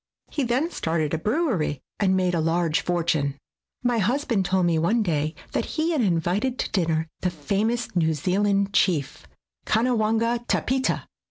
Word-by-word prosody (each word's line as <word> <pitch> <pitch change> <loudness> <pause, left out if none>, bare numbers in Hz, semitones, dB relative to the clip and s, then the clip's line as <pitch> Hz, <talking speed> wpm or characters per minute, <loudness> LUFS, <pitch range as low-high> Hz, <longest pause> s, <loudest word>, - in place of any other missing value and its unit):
He 295 - -1
then 260 +8 0
started 160 - -1
a 160 - 0
brewery 210 - 0 0.2
and 190 -2 +3
made 180 -1 +1
a 170 - +1
large 165 0 +1
fortune. 160 -5 0 0.5
My 245 -2 +2
husband 235 -1 +1
told 185 0 +2
me 165 -2 +2
one 215 +8 +2
day 155 -3 -1 0.2
that - - -1
he 320 +2 +1
had 310 -5 +1
invited 195 +6 0
to - - -3
dinner 160 -4 0
the 180 - 0
famous 200 +9 -1
New 160 -2 +2
Zealand 200 +4 +1
chief, 160 -10 +1 0.4
Kanawanga 230 0 +1
Tapita. 260 +1 0
190 Hz, 155 wpm, -24 LUFS, 165-235 Hz, 0.5 s, and